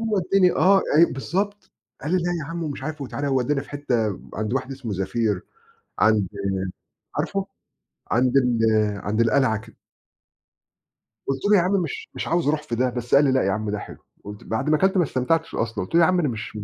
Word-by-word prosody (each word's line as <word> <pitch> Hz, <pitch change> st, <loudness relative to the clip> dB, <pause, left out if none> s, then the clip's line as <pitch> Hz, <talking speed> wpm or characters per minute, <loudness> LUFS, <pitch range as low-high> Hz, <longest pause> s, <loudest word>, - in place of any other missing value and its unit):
هو 225 Hz, -2 st, -1 dB
ودّاني 185 Hz, 0 st, +3 dB
آه، 195 Hz, +1 st, +4 dB
أيوه 170 Hz, -3 st, +5 dB
بالضبط. 200 Hz, +9 st, -3 dB, 0.3 s
قال 150 Hz, -, -3 dB
لي -, -, +4 dB
لأ 175 Hz, -, 0 dB, 0.2 s
يا -, -, -5 dB
عم 170 Hz, 0 st, -4 dB
ومش 140 Hz, -3 st, -5 dB
عارف 155 Hz, +1 st, -5 dB
وتعالَ 140 Hz, +2 st, -4 dB
وودّانا 135 Hz, +1 st, +1 dB
في -, -, -15 dB
حتّة 120 Hz, -8 st, -1 dB
عند 110 Hz, +2 st, -2 dB
واحد 135 Hz, 0 st, -2 dB
اسمه 130 Hz, -6 st, -6 dB
زفير 100 Hz, +3 st, -1 dB, 0.6 s
عند 110 Hz, -4 st, +3 dB, 0.9 s
عارفه؟ 195 Hz, -1 st, -1 dB, 0.7 s
عند 125 Hz, +2 st, +2 dB
ال 125 Hz, -3 st, +3 dB, 0.5 s
عند 110 Hz, +2 st, 0 dB
القلعة 115 Hz, 0 st, +3 dB
كده. 115 Hz, 0 st, -15 dB, 1.5 s
قُلت 135 Hz, +4 st, -2 dB
له 205 Hz, -, +7 dB
يا -, -, +4 dB
عم 180 Hz, +3 st, 0 dB
مش 155 Hz, -, -6 dB
مش -, -, -4 dB
عاوز 170 Hz, -3 st, +1 dB
أروح 150 Hz, +1 st, +1 dB
في 120 Hz, -, -4 dB
ده، 125 Hz, +2 st, +1 dB
بس 120 Hz, +1 st, -1 dB
قال 145 Hz, -, +6 dB
لي 135 Hz, -, +3 dB
لأ 130 Hz, -, +2 dB
يا 95 Hz, -, +1 dB
عم 110 Hz, 0 st, -2 dB
ده 105 Hz, 0 st, -2 dB
حلو -, -, -9 dB, 0.3 s
قُلت 105 Hz, 0 st, -9 dB
بعد 110 Hz, +7 st, -2 dB
ما 155 Hz, -, +4 dB
كلت 190 Hz, +3 st, +2 dB
ما 180 Hz, -, +5 dB
استمتعتش 160 Hz, +4 st, -1 dB
أصلًا. 115 Hz, 0 st, -2 dB
قُلت 165 Hz, -, -5 dB
له: 170 Hz, -, +6 dB
"يا -, -, +7 dB
عم 185 Hz, +1 st, +2 dB
أنا 150 Hz, -6 st, +1 dB
مش 115 Hz, -1 st, -6 dB
مش 105 Hz, -, -5 dB
135 Hz, 215 wpm, -23 LUFS, 115-165 Hz, 1.5 s, له